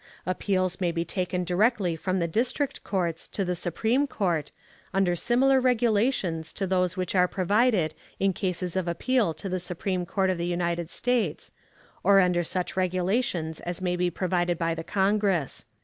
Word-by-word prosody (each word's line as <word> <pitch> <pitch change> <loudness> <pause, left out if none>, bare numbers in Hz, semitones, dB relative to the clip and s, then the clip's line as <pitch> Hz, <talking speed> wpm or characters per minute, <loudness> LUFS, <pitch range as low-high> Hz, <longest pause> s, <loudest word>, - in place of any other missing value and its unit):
Appeals 185 0 0
may 175 -2 +2
be 170 0 -2
taken 180 -1 -2
directly 185 0 +2
from 185 +3 -1
the 170 -2 0
District 250 - -1
Courts 175 -4 -2
to 195 - -2
the 180 - 0
Supreme 225 - 0
Court, 170 - -1 0.5
under 190 -2 +3
similar 260 +7 +3
regulations 220 -9 +1
to 195 - -2
those 180 -1 0
which 185 -1 -2
are 180 -1 +4
provided 195 -3 +2 0.3
in 195 0 +2
cases 180 -1 -3
of 185 -2 -1
appeal 225 +3 +1
to 195 - -6
the 185 -1 -1
Supreme 180 +1 -3
Court 190 0 +1
of 180 - -3
the 170 - -1
United 170 -1 -1
States, 240 -9 -1 0.5
or 195 +1 +6
under 180 -2 +3
such 180 +2 -3
regulations 185 -2 0
as 175 0 -5
may 180 -1 0
be 180 0 +1
provided 175 -1 0
by 165 0 0
the 165 0 -5
Congress. 195 - 0
185 Hz, 165 wpm, -27 LUFS, 175-200 Hz, 0.5 s, or